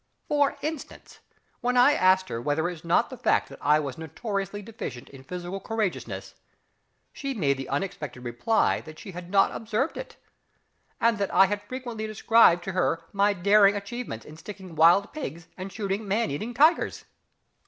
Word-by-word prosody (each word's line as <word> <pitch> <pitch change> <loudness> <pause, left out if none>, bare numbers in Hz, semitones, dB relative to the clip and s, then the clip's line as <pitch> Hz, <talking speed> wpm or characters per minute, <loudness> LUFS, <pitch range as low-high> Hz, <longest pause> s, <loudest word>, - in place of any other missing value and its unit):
For 290 -1 +2
instance, 310 -1 -6 0.4
when 250 +1 0
I 255 +4 +7
asked 185 -2 +3
her 115 - -3
whether 150 +5 0
it - - -2
was 165 -3 -10
not 170 - +2
the - - -8
fact - - +2
that - - -12
I 150 +2 +4
was 145 +1 -5
notoriously 200 - -4
deficient 190 - -7
in 135 -1 -13
physical 180 +5 -5
courageousness, 215 -1 -3 0.8
she 275 -2 -4
made 140 - +1
the 135 - -6
unexpected 145 -5 -4
reply 120 - +1
that 155 -1 -12
she 195 - -9
had 180 0 -8
not 195 0 +3
observed 225 +7 -2
it, - - -8 0.8
and 230 -2 +2
that 200 - -1
I 190 +2 +6
had 205 +1 -2
frequently 240 -2 -6
described 215 -4 +4
to 190 - -4
her 175 -2 0
my 200 +1 +3
daring 200 +2 +5
achievements 205 - -5
in 155 - -12
sticking 190 0 -10
wild 170 +6 +5
pigs 170 - -6
and 190 +1 -7
shooting 200 0 -3
man 205 -4 0
eating 220 +12 -4
tigers. 310 +6 +3
195 Hz, 175 wpm, -26 LUFS, 165-225 Hz, 0.8 s, I